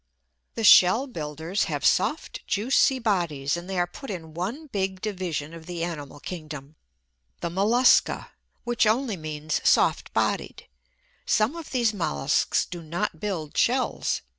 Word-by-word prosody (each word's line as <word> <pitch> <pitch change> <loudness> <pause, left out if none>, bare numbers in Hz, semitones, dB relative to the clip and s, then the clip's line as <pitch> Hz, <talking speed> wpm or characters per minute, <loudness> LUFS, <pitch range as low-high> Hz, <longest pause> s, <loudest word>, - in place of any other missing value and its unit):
The 225 - -3
shell 205 +4 +7
builders 160 - -3
have - - -3
soft, - - +1
juicy 260 +5 +3
bodies, 170 - 0
and 175 +2 -7
they 190 - -3
are 175 - +3
put 250 +10 -10
in 165 -5 -6
one 210 - -4
big 190 -7 -3
division 180 -7 -4
of 165 -1 -11
the 175 -2 -4
animal 150 -4 -6
kingdom 155 -4 -8 0.7
the 170 - -2
mollusca, 220 +8 +3 0.3
which 240 -2 +1
only 230 0 +1
means 155 -2 -3
soft - - +3
bodied. - - -1 0.6
Some 220 +8 +2
of 335 -3 -8
these 235 -4 +1
molluscs 120 - 0
do 175 -1 -8
not 160 0 -3
build 170 -7 -4
shells. - - +1
180 Hz, 140 wpm, -25 LUFS, 160-220 Hz, 0.7 s, shell